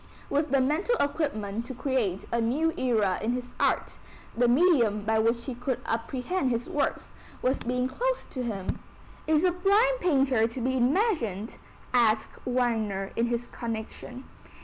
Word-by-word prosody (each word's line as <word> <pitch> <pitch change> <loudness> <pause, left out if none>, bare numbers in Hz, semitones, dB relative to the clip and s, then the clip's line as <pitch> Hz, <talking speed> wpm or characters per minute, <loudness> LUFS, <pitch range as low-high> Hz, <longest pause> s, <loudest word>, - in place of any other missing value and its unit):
With 295 +2 +1
the 275 -1 +3
mental 315 - +1
equipment 235 - -1
to 260 - -6
create 240 -8 -1
a 235 - +1
new 300 +8 +1
era 220 -7 +1
in 230 +3 0
his 250 0 -5
art, - - 0 0.4
the 245 +1 +3
medium 240 - +4
by 220 0 +2
which 230 +2 +1
he 265 - -3
could 245 +1 -2
apprehend 255 +7 -1
his 235 0 -1
works 290 -1 -2 0.3
was 255 +2 +2
being 250 +1 -1
closed - - -2
to 255 - -4
him. 205 -6 -3 0.5
"Is 310 +1 +3
a 365 - +4
blind 410 +8 +3
painter 270 - +3
to 230 +3 -7
be 260 +2 0
imagined?" 250 - 0 0.4
asks 225 -3 +2
Wagner 220 -6 0
in 235 +1 +1
this 240 0 -1
connection. 235 +2 -6
250 Hz, 155 wpm, -28 LUFS, 230-285 Hz, 0.5 s, medium